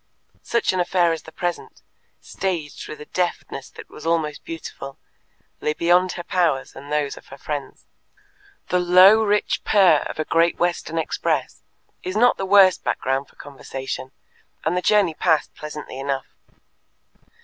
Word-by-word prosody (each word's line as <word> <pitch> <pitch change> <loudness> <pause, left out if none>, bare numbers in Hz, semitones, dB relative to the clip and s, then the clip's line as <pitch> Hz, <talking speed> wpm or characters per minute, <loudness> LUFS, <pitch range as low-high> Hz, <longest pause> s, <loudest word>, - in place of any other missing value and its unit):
Such 235 -4 0
an 185 - -1
affair 175 -1 +2
as 165 -1 -3
the 160 - -13
present, 175 +1 -5 0.4
staged 170 -6 -4
with 155 - -8
a - - -8
deftness 175 -6 -3
that - - -12
was 150 - -12
almost 160 -2 -1
beautiful, 140 -4 -8 0.6
lay 150 - 0
beyond 175 +2 +3
her 175 - -6
powers 170 -7 0
and 140 +2 -10
those 150 -2 -1
of - - -14
her 135 - -11
friends. 145 -1 -6 0.8
The 180 - +2
low 185 +5 +7
rich 210 -1 0
purr 190 -7 +5
of - - -7
a 155 - -1
Great 165 +1 +2
Western 175 -1 -1
express 160 - -1 0.4
is 185 +3 -4
not 245 +2 +4
the 195 - -3
worst 195 -2 +6
background 135 +1 -1
for - - -25
conversation, 135 -1 -7 0.5
and 165 +3 +1
the 180 - 0
journey 200 -4 +3
passed 160 -1 +1
pleasantly 150 -3 -8
enough. 135 -1 -3
165 Hz, 155 wpm, -22 LUFS, 150-185 Hz, 0.8 s, low